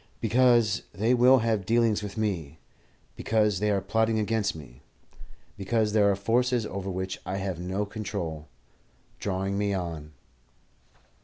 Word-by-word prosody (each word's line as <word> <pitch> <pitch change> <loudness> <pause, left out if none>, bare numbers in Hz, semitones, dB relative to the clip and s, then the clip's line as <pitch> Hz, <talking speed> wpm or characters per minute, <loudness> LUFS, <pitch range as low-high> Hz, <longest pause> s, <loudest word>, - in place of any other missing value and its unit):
"Because 120 -2 +3
they 110 +6 +1
will 125 +2 +6
have 110 -3 +1
dealings 115 0 +2
with 105 +1 -7
me; 85 -9 -2 0.6
because 105 -4 +1
they 105 +1 +1
are 100 -2 +1
plotting 110 +1 +1
against 110 -2 0
me; 70 -4 -12 0.7
because 105 +1 0
there 105 -2 +4
are 100 - +2
forces, 120 +3 +1
over 100 -2 -5
which 95 0 -4
I 95 - -4
have 95 -3 -3
no 95 +4 -2
control, 100 -8 -5 0.7
drawing 95 0 -2
me 100 -1 0
on." 80 -4 -5
100 Hz, 140 wpm, -27 LUFS, 95-110 Hz, 0.7 s, will